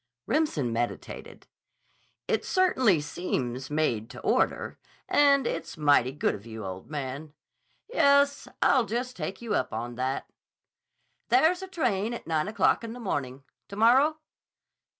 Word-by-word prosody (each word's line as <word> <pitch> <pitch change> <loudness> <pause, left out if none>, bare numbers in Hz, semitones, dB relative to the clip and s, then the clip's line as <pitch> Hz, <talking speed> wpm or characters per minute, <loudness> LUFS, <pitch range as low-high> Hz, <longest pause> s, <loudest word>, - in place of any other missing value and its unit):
Remsen 155 - 0
meditated. 120 +1 -5 0.8
"It - - 0
certainly 260 - +3
seems 130 -5 -3
made 125 -8 0
to - - -10
order. - - 0 0.3
And 280 -2 +4
it's 165 - -4
mighty 145 -4 +4
good 145 - 0
of 100 - -8
you, 110 -2 -8
old 95 0 -7
man. 145 +1 -5 0.5
Yes, 280 - +3 0.2
I'll 260 -4 +4
just 245 +4 -3
take 195 0 -5
you 230 - -2
up - - 0
on 120 +2 -4
that." 130 +1 -2 1.0
"There's 360 0 +4
a 380 - -6
train 240 - -1
at - - -9
nine 160 +1 0
o'clock 215 +2 +2
in 230 0 -5
the 245 - -9
morning. 140 - -3 0.2
To 200 - -9
morrow?" 260 +8 +4
185 Hz, 140 wpm, -27 LUFS, -, 1.0 s, And